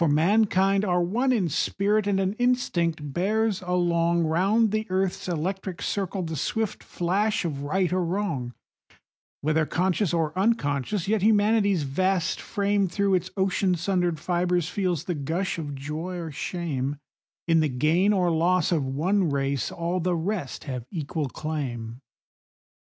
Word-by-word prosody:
For 170 - +4
mankind 195 +5 +3
are 180 -3 +2
one 240 +9 +1
in 210 -8 +2
spirit, 200 +6 +1
and 195 -1 +2
an 190 0 0
instinct 170 - 0
bears 210 +3 +1
along, 170 -1 +1
Round 195 +7 +2
the 215 0 -1
earth's 185 0 -1
electric 185 +2 -3
circle, 195 -1 -2
the 160 -1 -4
swift 220 - -2
flash 195 +4 0
of 145 -4 -3
right 180 +5 0
or 185 -1 +1
wrong; 165 -9 -2 0.9
Whether 155 +1 +1
conscious 185 +1 +1
or 165 -2 0
unconscious, 190 - 0
yet 215 -1 +1
Humanity's 205 -4 +3
vast 185 +6 0
frame 200 -1 0
Through 200 +2 0
its 180 0 +1
ocean 190 -1 +1
sundered 175 -2 0
fibres 175 0 0
feels 180 -6 -1
the 180 - -2
gush 165 +5 -2
of 145 -3 -5
joy 155 +6 -5
or 165 -2 -5
shame;— 145 -4 -3 0.5
In 165 -1 +4
the 155 -1 +2
gain 155 +10 +2
or 180 -4 +2
loss 170 +1 +2
of 160 -5 +2
one 165 +8 +1
race 140 -3 -1
all 170 +2 -2
the 180 0 0
rest 175 -3 -3
have 130 -5 -5
equal 150 -3 -3
claim. 125 -7 -4
180 Hz, 150 wpm, -26 LUFS, 155-195 Hz, 0.9 s, For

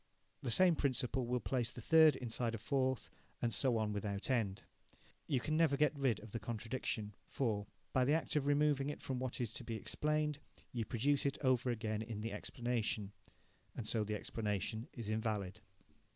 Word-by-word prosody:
The 130 - -2
same 175 +8 +5
principle 130 -3 0
will 125 +1 +1
place 120 -2 0
the - - -8
third 160 -2 +7
inside 120 -1 -1
a - - -3
fourth, 130 +2 0 0.3
and 115 -1 0
so 125 +2 +2
on 110 -1 0
without 100 +3 -2
end. 105 -6 0 0.6
You 135 - +2
can 155 +5 -1
never 155 -3 +4
get 150 +1 +3
rid 135 -6 +1
of 110 - -11
the 115 - -3
contradiction, 110 -1 -3 0.2
for, 105 -6 -1 0.3
by 130 -1 +4
the 145 - +3
act 160 0 0
of 145 -2 +2
removing 145 -1 +3
it 145 - -4
from 130 -2 -2
what 130 -1 -3
is 115 -3 -2
to - - -6
be 115 - -4
explained, 150 +5 0 0.3
you 115 -3 -1
produce 135 +6 +1
it 140 - -1
over 130 -2 +3
again 110 -2 -1
in 110 -1 -5
the 115 +1 -3
explanation. 115 -4 -2 0.6
And 110 - -4
so 110 0 +2
the 105 0 -2
explanation 110 +2 -2
is 115 -4 -7
invalid. 110 -2 -1
120 Hz, 185 wpm, -37 LUFS, 110-135 Hz, 0.6 s, third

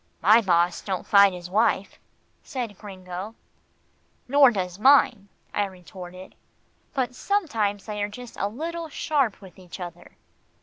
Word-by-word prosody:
"My 215 +6 +6
boss 175 -3 +2
don't 190 -3 -4
fight 200 -1 +6
his 175 -1 -8
wife," 205 +1 0 0.4
said 240 -6 -5
Gringo. 190 +1 -8 0.9
"Nor 280 +1 +7
does 185 -4 -3
mine," 250 -5 +4 0.2
I 205 - +1
retorted, 185 -1 -11 0.6
"but 255 -2 -1
sometimes 230 - -1
they 210 -1 -4
are 205 - -1
just 245 +2 -10
a 200 - 0
little 325 +8 -5
sharp 280 -8 0
with 190 -2 -14
each 180 0 -11
other. 175 -2 -9
205 Hz, 135 wpm, -25 LUFS, 185-245 Hz, 0.9 s, Nor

